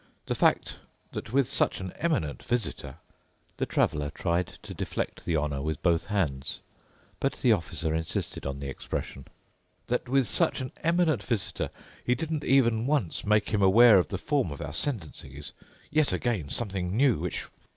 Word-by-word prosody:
The - - -1
fact - - +2 0.3
that - - -6
with 135 -1 +3
such - - +2
an 95 -2 -5
eminent 150 - -1
visitor"—the 105 - -5
traveler 75 -1 +1
tried 85 +2 0 0.2
to - - -7
deflect - - -4
the 85 - +1
honour 75 -2 -1
with 75 0 -3
both 85 -2 +2
hands, 80 -11 -1 0.6
but 135 - +1
the 125 - +2
officer 80 -4 -2
insisted 80 0 -2
on 70 0 -4
the 70 - -5
expression—"that 90 - -6
with 135 -2 +3
such - - +2
an 130 -1 -4
eminent 165 - +2
visitor 110 -3 -2 0.3
he 125 - +2
didn't 155 +2 -3
even 120 -3 +3
once 140 - 0
make 105 0 +3
him 105 -2 +1
aware 105 +2 +8
of 90 - +1
the 95 - -3
form 140 - 0
of 70 - -7
our 75 0 -5
sentencing 80 - -3
is 75 0 -7 0.4
yet 155 -1 +3
again 110 - -1
something 95 -4 -2
new, 130 - +4
which 90 +1 -3
100 Hz, 160 wpm, -28 LUFS, 80-125 Hz, 0.6 s, aware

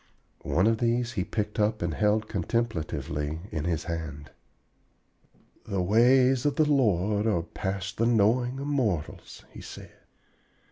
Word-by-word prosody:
One 90 - +2
of 110 0 +2
these 120 0 0
he 100 -7 -2
picked 105 +2 -3
up 105 -2 +1
and 85 -2 -1
held 105 +3 +1
contemplatively 80 -8 -2
in 75 -1 -3
his 85 -2 -1
hand. 80 -5 -6 1.4
"The 100 - -2
ways 125 +5 +4
of 145 - +1
the 155 - +3
Lord 105 - +2
are 90 -7 +1
past 95 +2 -5
the 115 - +2
knowing 120 +3 +2
of 140 - -4
mortals," 115 - -2
he - - -11
said. - - -11
105 Hz, 140 wpm, -27 LUFS, 85-120 Hz, 1.4 s, ways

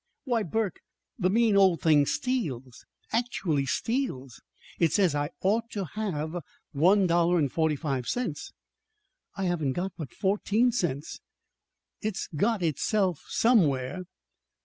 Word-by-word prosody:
"Why, 240 -4 0
Burke, 210 0 -2 0.4
the 185 -2 +2
mean 220 +1 +3
old 190 -4 +4
thing 150 -3 +4
steals 155 - -3 0.2
actually 185 - 0
steals! 145 - -2 0.4
It 165 -3 +3
says 185 -6 +3
I 145 0 -1
ought 225 +4 +1
to 200 -3 -2
have 175 -6 -3 0.3
one 185 +7 +4
dollar 175 0 +3
and 145 -5 +1
forty 160 -2 +1
five 135 -4 -3
cents; 235 -12 -3 0.9
and 195 - -1
I - - +1
haven't 155 -7 0
got 180 +3 -3
but 155 -7 -6
fourteen 210 +4 +1
cents! 160 - -2 0.8
It's 215 -3 -3
got 205 +4 +1
it 165 - +3
itself 185 +2 0
somewhere!" 180 - +2
180 Hz, 135 wpm, -28 LUFS, 150-215 Hz, 0.9 s, old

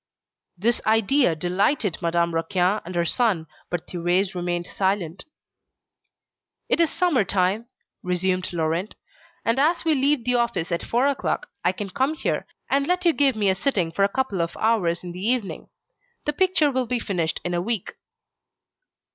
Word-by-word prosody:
This 225 +6 +1
idea 225 - +3
delighted 185 - 0
Madame 170 0 +1
Raquin 180 +4 +1
and 180 +1 -7
her 170 0 +1
son, 200 -5 +1 0.2
but 175 -2 -3
Thérèse 180 +2 0
remained 175 -1 -2
silent. 190 -2 -2 1.4
"It - - +1
is 335 -2 +4
summer 335 - +2
time," 195 +4 0 0.3
resumed 185 +1 -1
Laurent, 170 +3 -1 0.5
"and 230 +3 +2
as 325 +4 +2
we 320 - +4
leave 280 -2 +2
the 250 - +2
office 235 -8 0
at 170 - 0
four 245 +3 +1
o'clock, 285 - -1
I - - +3
can 205 -5 -6
come 270 +9 0
here, - - -2 0.2
and 275 +1 +1
let 360 0 0
you 340 - +5
give 275 -4 +3
me 210 -2 +1
a 190 - +4
sitting 190 - 0
for 185 - -2
a 200 - +4
couple 210 -6 -1
of 170 0 -3
hours 190 -7 +1
in 175 - -6
the 180 +1 -8
evening. 230 -2 -1 0.6
The 295 - 0
picture 340 -3 +3
will 255 -2 -1
be 250 +1 0
finished 170 -7 -1
in 175 - -1
a 175 - 0
week." 215 0 -3
200 Hz, 170 wpm, -24 LUFS, 175-260 Hz, 1.4 s, you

